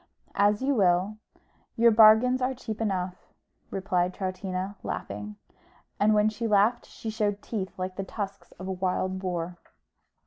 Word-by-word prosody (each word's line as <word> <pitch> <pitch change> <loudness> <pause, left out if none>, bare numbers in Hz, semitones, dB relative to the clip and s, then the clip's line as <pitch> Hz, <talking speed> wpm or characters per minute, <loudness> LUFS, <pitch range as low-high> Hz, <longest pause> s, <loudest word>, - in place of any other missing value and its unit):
"As 205 +3 +2
you 280 +1 +2
will; 190 -1 +2 0.6
your 235 0 +5
bargains 225 +4 +6
are 260 +1 0
cheap 225 -3 -6
enough," 185 -4 -2 0.4
replied 185 -2 -1
Troutina, 185 0 -3
laughing: 105 +1 -5 0.6
and 215 +1 +4
when 210 0 +4
she 215 +2 -2
laughed 210 +3 +3
she 225 - -6
showed 210 -2 -1
teeth 195 -5 -4
like 185 0 -4
the 195 - -2
tusks 195 -2 -6
of 185 - -9
a - - -2
wild 185 0 -1
boar. 175 -2 -3
200 Hz, 145 wpm, -27 LUFS, 185-215 Hz, 0.6 s, bargains